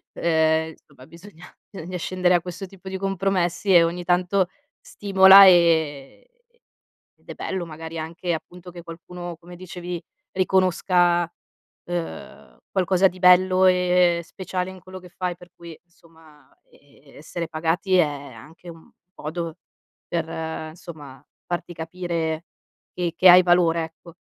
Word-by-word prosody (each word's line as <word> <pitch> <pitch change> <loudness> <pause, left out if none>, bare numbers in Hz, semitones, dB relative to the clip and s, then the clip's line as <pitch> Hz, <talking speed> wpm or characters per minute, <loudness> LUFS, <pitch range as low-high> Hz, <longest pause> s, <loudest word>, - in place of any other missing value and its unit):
ehm, 160 -1 +1
somma 135 -3 -18
bisogna 170 +1 -15 0.3
bisogna 180 -1 -7
scendere 180 +1 0
a 175 - +3
questo 180 +3 -8
tipo 190 0 -13
di 190 - -5
compromessi 195 -1 0
e 170 - +8
ogni 175 +1 -3
tanto 180 +2 +1 0.3
stimola, 195 -1 +6
ehm, 160 -6 +2 1.0
ed - - -33
è - - -7
bello 190 -2 -4
magari 160 +1 -8
anche, 170 +2 -4
appunto 180 +2 -10
che 175 0 -10
qualcuno, 175 +1 -9
come 175 +1 -13
dicevi, 180 -1 -7 0.3
riconosca, 180 -2 +1 0.5
ehm, 165 - -7
qualcosa 190 0 +2
di 185 0 -13
bello 185 +1 +5
e 180 -1 +3
speciale 185 +1 -5
in 185 -1 -12
quello 185 +1 -11
che 180 - -14
fai, 180 -1 -4
per 180 0 -17
cui 170 -2 -12
somma, 160 -4 -22 0.2
ehm, 140 0 -23
essere 170 +3 -6
pagati 165 +3 -1
è 180 - +5 0.3
anche 155 +10 -15
un 165 -1 -16 0.3
modo 165 +2 -5 0.5
per, 160 -1 -5
somma, 145 -6 -12 0.2
farti 175 0 -5
capire 165 -1 -4 0.5
che 175 -2 -2
che 185 - +6
hai 180 +1 +9
valore, 175 -2 +2
ecco. 165 +1 -14
175 Hz, 135 wpm, -23 LUFS, 165-180 Hz, 1.0 s, hai